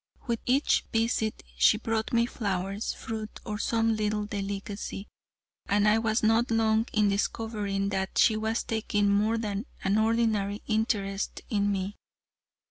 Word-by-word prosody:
With 235 -3 -1
each 265 +4 +3
visit 225 -1 0
she 210 - +5
brought 220 0 -1 0.2
flowers, 195 -2 -2
fruit, 220 -1 -6
or 210 -2 -4
some 225 -1 +1
little 210 -1 -1
delicacy, 200 0 -5 0.6
and 205 +1 +3
I 215 +1 +5
was 225 0 0
not 225 +2 +3
long 225 0 +2
in 210 -1 +3
discovering 200 -1 -1
that 190 -1 -2
she 220 - +5
was 220 +1 -1
taking 205 -2 0
more 215 +3 +2
than 210 +1 -3 0.2
an 195 +2 +2
ordinary 220 -2 +1
interest 210 -3 -1
in 205 -1 +2
me. 195 +1 -3
215 Hz, 135 wpm, -28 LUFS, 200-225 Hz, 0.6 s, she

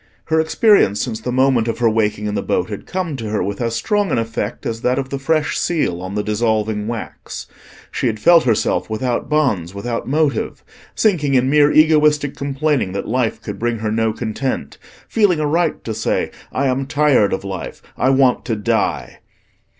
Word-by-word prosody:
Her 160 0 +3
experience 160 - +3
since 110 -1 -3
the 125 - -3
moment 130 -2 +2
of 115 - -2
her 120 - +2
waking 105 -1 0
in 105 - -2
the 105 - -1
boat - - -1
had - - -7
come 180 -5 -3
to 110 -4 -5
her 105 -3 -1
with 100 +3 -4
as 115 -1 -1
strong 205 - 0
an - - +1
effect 115 -2 -3
as 115 0 -3
that 125 0 +1
of 135 -1 -2
the 140 - -4
fresh 155 +2 0
seal 120 - -1
on 95 +2 -6
the 105 - -1
dissolving 105 -1 0
wax. 115 -1 -6 0.5
She - - -1
had 110 -2 -2
felt 170 +6 +5
herself 115 -2 +1
without 120 +3 -2
bonds, 105 - 0
without 115 +3 -4
motive; 155 - 0 0.3
sinking 155 -10 +2
in 130 +1 +3
mere 150 0 +5
egoistic 150 -2 +4
complaining 140 -6 -1
that 100 - -4
life 120 0 -1
could 105 - -6
bring 120 0 -1
her 110 -1 -2
no 110 0 +1
content; 120 +4 -4 0.3
feeling 200 -7 +2
a 155 - 0
right 165 +2 0
to 110 - -4
say, 110 - -1 0.2
"I 140 - -1
am 135 0 0
tired 145 -8 +3
of - - -2
life, 95 -2 -6
I 130 - +1
want 135 -2 +3
to 115 - -1
die." 105 - -1
125 Hz, 195 wpm, -19 LUFS, 110-150 Hz, 0.5 s, felt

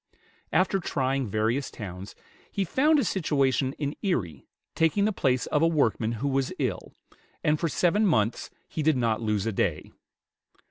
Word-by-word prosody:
After 185 +4 +2
trying 135 -5 -1
various 110 +6 0
towns, 95 -2 -8 0.4
he 200 - -1
found 300 - +3
a 280 - +2
situation 140 -6 +1
in 145 0 -4
Erie, 100 - -2 0.3
taking 165 +5 +2
the 215 - +1
place 130 -7 +1
of 150 - 0
a 165 - +5
workman 115 -8 +1
who 125 +5 -2
was 135 -1 0
ill, - - -3 0.5
and 150 0 +2
for 165 - 0
seven 200 +7 +2
months 110 - +1 0.2
he 155 - -4
did 155 -2 +3
not 115 -2 0
lose 105 -2 0
a 115 - 0
day. 85 -6 -1
135 Hz, 165 wpm, -27 LUFS, 110-165 Hz, 0.5 s, a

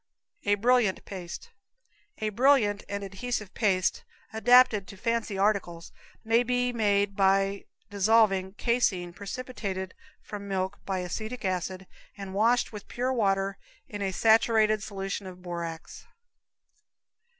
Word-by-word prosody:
A 205 - +4
Brilliant 235 -2 +2
Paste. 180 -3 -8 0.7
A 215 - -2
brilliant 220 -3 +3
and 200 0 -3
adhesive 200 +1 -4
paste, 190 -4 +1 0.3
adapted 230 -2 +5
to 195 - -11
fancy 230 -1 -1
articles, 190 -4 0 0.3
may 225 +1 +3
be 245 0 0
made 205 -3 +1
by 195 0 +2 0.3
dissolving 200 -2 +3
caseine 200 -7 0
precipitated 200 -2 -5 0.3
from 205 -1 -7
milk 190 +1 -3
by 190 -2 -1
acetic 215 +6 -5
acid 185 0 -2 0.3
and 195 -1 -7
washed 230 +4 +2
with 210 -1 -9
pure 255 +2 -1
water 195 -4 0 0.3
in 205 -1 -7
a 195 -1 -1
saturated 220 0 +3
solution 195 -1 -5
of 180 -1 -11
borax. 170 -2 -6
200 Hz, 120 wpm, -28 LUFS, 190-225 Hz, 0.7 s, adapted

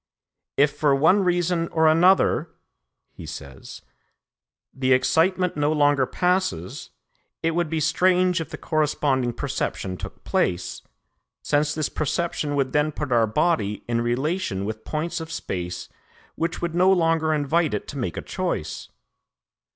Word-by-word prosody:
"If, 145 +1 +4
for 145 -3 +3
one 160 +8 +4
reason 175 -1 +1
or 160 -1 +2
another," 170 0 +4 0.6
he - - -10
says, 65 -1 -9 0.9
"the 130 -1 +2
excitement 180 +7 +2
no 145 0 +1
longer 145 -3 +3
passes, 180 - -1 0.5
it 165 - +2
would 170 -1 -1
be 160 0 -1
strange 180 +3 +2
if 165 - -6
the - - -7
corresponding 145 -5 0
perception 120 -7 -3
took - - -9
place, 90 0 -1 0.6
since 145 0 +1
this 155 -2 0
perception 150 -1 -2
would 135 -2 0
then 150 +1 +2
put 145 -2 -5
our 115 -2 +4
body 110 -5 0
in 115 0 0
relation 120 - -1
with 110 +1 -6
points 160 +3 -3
of 160 0 -7
space 90 - -4 0.5
which 170 +1 -3
would 170 -1 -1
no 180 +2 +4
longer 165 -3 +2
invite 155 -1 +1
it 105 - -5
to 145 - -6
make 105 -10 -3
a - - -4
choice. - - -4
155 Hz, 145 wpm, -24 LUFS, 130-170 Hz, 0.9 s, If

